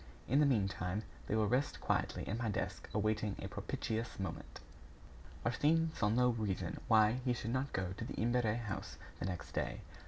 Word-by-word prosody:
In 135 +4 +4
the 150 - +6
meantime, 100 -4 +1 0.2
they - - +1
will 110 -1 +3
rest 130 +6 +1
quietly - - 0
in 110 +4 -1
my 115 -2 0
desk 100 - -3
awaiting 105 -1 +1
a - - -4
propitious 110 -1 -3
moment." 95 -4 -5 0.9
Arsène 160 +7 +3
saw 105 - +2
no 125 +3 +4
reason 100 -7 -1
why 110 +1 +5
he 125 -1 +2
should 115 -1 -3
not 130 +2 0
go 95 -1 -1
to 115 - -4
the - - -5
Imbert 120 +2 +2 0.2
house 105 -5 -5 0.2
the - - -2
next 90 -2 -4
day. - - -2
110 Hz, 180 wpm, -36 LUFS, 100-125 Hz, 0.9 s, the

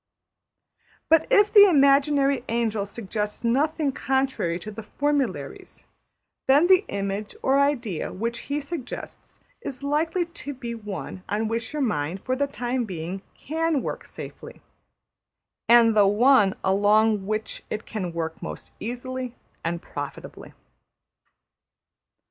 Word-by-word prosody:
But 325 -1 +5
if 410 0 +4
the 410 -2 +9
imaginary 280 -2 +4
angel 225 -3 0
suggests 210 0 -4
nothing 285 +5 +1
contrary 265 -11 0
to 210 +4 -8
the 225 - -7
formularies, 285 +5 -3 0.6
then 285 +5 +6
the 375 +2 +5
image 200 +1 -3
or 270 +1 +3
idea 250 - 0
which 235 +4 -3
he 285 +1 0
suggests 280 -3 -8 0.2
is 275 - -6
likely 320 +5 0
to 310 -4 -8
be 240 -2 -5
one 195 -6 -6
on 215 +2 0
which 230 +1 -3
your 300 -2 -1
mind 170 - -1
for 255 - 0
the 285 +2 0
time 250 -2 -2
being 180 0 -5
can 320 -1 -1
work - - -4
safely, - - -10 1.1
and 235 -1 +7
\emph{the} 205 -2 +5
one 215 -3 +5
along 205 +1 +3
which 215 +1 -3
it 215 - -4
can 185 -5 -4
work 165 -1 -4
most - - -7
easily 250 +2 -5 0.3
and 170 0 -3
profitably. 145 -1 -8
235 Hz, 125 wpm, -25 LUFS, 205-280 Hz, 1.1 s, the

